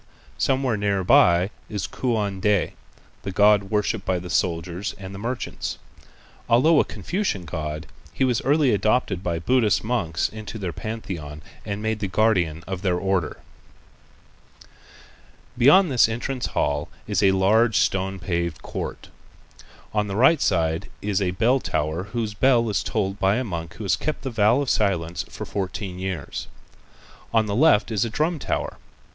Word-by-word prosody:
Somewhere 130 -4 +1
near 100 -2 0
by 90 +2 +5 0.2
is 105 -3 -3
Kuan 105 -6 -2
Ti, 105 -3 +2 0.5
the - - -5
god 100 +1 +4
worshipped 105 0 -1
by 95 -1 0
the 90 0 -6
soldiers 85 +3 -1
and 95 0 -8
merchants. 115 +6 -4 0.7
Although 150 +7 +5
a - - +5
Confucian 180 - -3
god, 75 0 -4 0.3
he - - -1
was 125 -1 +2
early 140 -2 +3
adopted 105 -3 +1
by 85 -2 -1
Buddhist 115 +5 +2
monks 100 -9 0
into 110 +1 -8
their 95 -5 -4
pantheon 85 -10 -6 0.2
and 100 +1 -4
made 110 0 -1
the 105 - -2
guardian 95 -6 +1
of 95 -1 -5
their 90 -3 +1
Order. 95 -4 -1 2.1
Beyond 145 +8 +6
this 120 -3 +4
entrance 125 +3 -3
hall 75 +1 -1 0.2
is - - 0
a 100 - +5
large 105 +4 +3
stone 95 -1 +1
paved 85 -3 -3
court. - - -6 0.8
On 105 -1 +1
the 100 - -4
right 135 +7 +5
side 80 -3 0
is 100 -1 0
a 95 - +1
bell 115 +8 +2
tower 80 -3 -2
whose 110 0 -3
bell 120 -1 +3
is 100 - 0
tolled 100 -2 -2
by 95 +1 +3
a 130 - 0
monk 85 -7 -5
who 110 - -7
has 95 -3 +2
kept 155 +11 -3
the 135 - -3
vow 110 +4 +3
of 140 - -2
silence 90 -5 0
for - - -7
fourteen 95 -1 -4
years. 95 -5 -4 0.8
On 110 -1 +3
the 100 -1 -2
left 120 -5 +4
is 105 -3 +1
a 115 - -2
drum 155 +7 -1
tower. - - -3
100 Hz, 160 wpm, -24 LUFS, 90-115 Hz, 2.1 s, Beyond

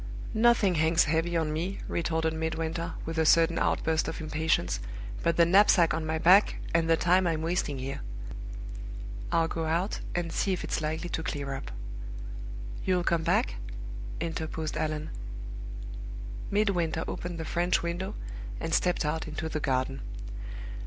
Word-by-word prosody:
"Nothing 225 -4 +5
hangs 160 +1 +4
heavy 165 +2 +1
on 155 -2 0
me," 175 +5 -2
retorted 160 -1 0
Midwinter, 160 +1 -2
with 165 0 -2
a - - +5
sudden 165 +1 +5
outburst 160 0 +2
of - - -3
impatience, 155 - +1 0.4
"but 170 - +2
the 170 - +7
knapsack 185 -1 +6
on 160 0 -1
my 160 0 +1
back, 185 +6 +6 0.2
and 165 0 +3
the 165 - +5
time 180 +2 +4
I'm 160 -1 0
wasting 165 -4 0
here. 135 +1 -4 1.3
I'll 165 -1 +3
go 165 0 -2
out, 170 +6 0 0.2
and 175 -1 -1
see 195 - +1
if 180 - -2
it's - - -1
likely 160 +3 -2
to 165 - -2
clear 140 -3 -3
up." 135 - -5 1.1
"You'll 180 -1 +2
come 170 -1 +2
back?" - - +2 0.6
interposed 160 -1 -3
Allan. 155 0 -1 1.4
Midwinter 175 -6 +1
opened 175 -1 -4
the 160 - -4
French 175 +2 +1
window, 170 +2 -2 0.4
and - - -2
stepped 180 -2 +2
out 160 +2 -1
into 155 +1 -3
the 155 - -1
garden. 135 -1 0
165 Hz, 150 wpm, -29 LUFS, 160-175 Hz, 1.4 s, the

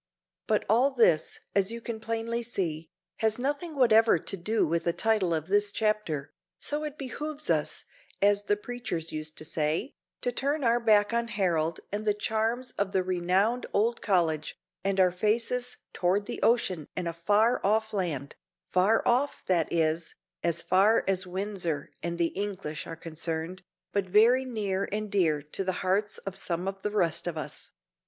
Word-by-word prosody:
But - - +1
all 240 +6 +4
this, 225 - +2
as 200 +1 +3
you 230 - -5
can 230 -1 -5
plainly 230 +1 -2
see, 165 -9 -2 0.3
has 220 -1 +2
nothing 290 +5 -2
whatever 225 -6 +5
to 165 - -3
do 215 +5 +1
with 165 +2 0
the 170 - +2
title 215 -5 +1
of 160 -2 0
this 205 +3 +2
chapter, 210 -11 -1 0.2
so 295 +1 -2
it 300 -1 -5
"behooves 295 +3 -3
us," - - -1 0.3
as 205 0 +3
the 205 - +2
preachers 210 -8 -4
used 155 0 -4
to 155 - -2
say, 155 - -1 0.3
to 245 - 0
turn 280 +4 -1
our 235 0 +3
back 215 -2 +4
on 235 0 +1
Harold 170 -7 0
and 205 +1 -2
the 210 -1 +1
charms 225 +4 -1
of 200 -1 0
the 190 - +2
renowned 185 +6 +1
old 230 +3 +1
college, 165 -6 +1 0.3
and 195 0 0
our 185 -1 +5
faces 235 +6 0 0.2
toward 190 +3 +1
the - - -4
ocean 190 -10 +2
and 180 -2 -2
a 170 - -2
far 205 +8 +2
off 220 +2 +1
land 160 -9 -2 0.3
far 195 - +2
off, 260 +4 +1
that 175 -4 +1
is, 165 0 0 0.3
as 170 -1 0
far 200 +5 +4
as 190 -1 +1
Windsor 180 -5 -3
and 170 0 -3
the 170 -1 +2
English 195 -6 -4
are 165 - -6
concerned, 165 +2 -4 0.3
but 200 -2 0
very 235 +7 +5
near 200 -5 -2
and 210 0 -3
dear 160 -7 +2
to 150 +6 -3
the 190 - 0
hearts 200 +3 +1
of 195 -1 -6
some 175 0 -1
of 195 0 -4
the 210 - -1
rest 175 -6 +1
of 170 -2 -3
us. 155 - -6
200 Hz, 175 wpm, -28 LUFS, 170-225 Hz, 0.3 s, whatever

